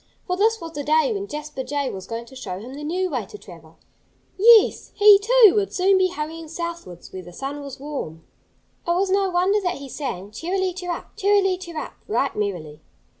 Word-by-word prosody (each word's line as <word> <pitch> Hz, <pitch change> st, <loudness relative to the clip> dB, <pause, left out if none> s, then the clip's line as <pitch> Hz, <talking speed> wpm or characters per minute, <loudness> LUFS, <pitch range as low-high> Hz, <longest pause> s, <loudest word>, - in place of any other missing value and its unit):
For 360 Hz, -, -1 dB
this 445 Hz, +4 st, +2 dB
was 330 Hz, -3 st, -7 dB
the 290 Hz, -2 st, -5 dB
day 315 Hz, -, +3 dB
when 400 Hz, -1 st, -4 dB
Jasper 300 Hz, -4 st, -6 dB
Jay 280 Hz, +1 st, -2 dB
was 190 Hz, -1 st, -8 dB
going 230 Hz, 0 st, -5 dB
to 265 Hz, -, -15 dB
show 190 Hz, -8 st, -6 dB
him 235 Hz, +7 st, -9 dB
the 290 Hz, +2 st, -8 dB
new 360 Hz, +5 st, -1 dB
way 240 Hz, -8 st, -3 dB
to 210 Hz, -, -10 dB
travel. 165 Hz, -5 st, -15 dB, 0.6 s
Yes! 445 Hz, +1 st, +5 dB
he, 410 Hz, -1 st, +8 dB
too, 450 Hz, -1 st, +6 dB
would 410 Hz, -2 st, 0 dB
soon 380 Hz, +1 st, +3 dB
be 375 Hz, -, +4 dB
hurrying 325 Hz, -1 st, -6 dB
southwards, 335 Hz, -, -7 dB
where 185 Hz, -, -6 dB
the 175 Hz, -, -12 dB
sun 275 Hz, +9 st, -6 dB
was 280 Hz, -2 st, -9 dB
warm. 265 Hz, -, -6 dB, 0.6 s
It 345 Hz, -, +2 dB
was 380 Hz, +1 st, +1 dB
no 390 Hz, 0 st, +2 dB
wonder 370 Hz, +4 st, +2 dB
that 360 Hz, -2 st, -1 dB
he 280 Hz, 0 st, -9 dB
sang, 215 Hz, -7 st, -5 dB
"Cheerily 365 Hz, -, -2 dB
cheerup, 355 Hz, -1 st, -6 dB
cheerily 395 Hz, -1 st, +3 dB
cheerup," 345 Hz, -4 st, -7 dB
right 280 Hz, -9 st, 0 dB
merrily. 175 Hz, -8 st, -4 dB
320 Hz, 200 wpm, -23 LUFS, 255-380 Hz, 0.6 s, he